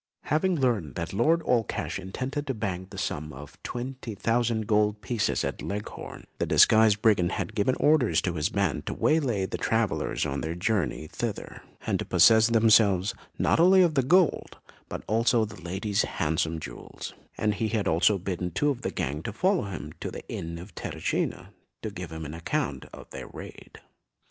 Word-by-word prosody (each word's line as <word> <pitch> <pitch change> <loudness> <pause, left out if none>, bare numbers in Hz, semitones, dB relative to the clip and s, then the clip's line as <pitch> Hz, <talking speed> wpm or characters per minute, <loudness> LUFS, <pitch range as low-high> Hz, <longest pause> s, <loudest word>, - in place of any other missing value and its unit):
Having 175 +5 +1
learnt 110 - 0
that 85 +1 -4
Lord 165 +11 +3
Allcash 115 -6 0
intended 130 +10 -4
to 135 - -1
bank 95 -3 -4
the - - -10
sum 75 +1 -3
of 70 +1 -12
twenty 125 -2 -5
thousand 115 +1 0
gold 105 0 +2
pieces 115 -4 0
at - - -4
Leghorn, 105 +1 -6
the - - 0
disguised 110 -1 +5
brigand 95 -5 +3
had 105 - -3
given 110 +4 +1
orders 125 - +3
to 90 - -1
his 75 -3 0
band 100 -6 -1
to - - -2
waylay 125 -11 +1
the - - -5
travellers 115 -2 0
on 70 +1 -2
their 80 +1 -3
journey 90 -3 -1
thither, - - -5 0.2
and - - 0
to - - -3
possess 110 -1 +6
themselves, 110 -4 +4 0.2
not - - +2
only 185 +2 +7
of 170 -3 +2
the 135 - +3
gold, 175 +5 +2 0.3
but - - -6
also 115 +2 +2
of 110 - -3
the 90 - -11
lady's 95 +4 -1
handsome 80 +1 -1
jewels; - - -8 0.2
and 105 -1 +1
he 110 +2 -1
had 110 -1 -1
also 90 +5 +3
bidden 90 -1 -3
two 145 - +1
of 125 - -5
the - - -2
gang 70 +3 -3
to 105 - -4
follow 185 - +1
him 95 -2 -6
to - - -4
the - - -9
inn 85 0 -5
of 90 +4 -10
Terracina, - - -3 0.3
to 110 - -3
give 90 -4 -7
him 80 0 -6
an 75 - -6
account 80 0 -2
of - - -11
their - - -7
raid. - - -11
105 Hz, 185 wpm, -27 LUFS, 90-120 Hz, 0.3 s, only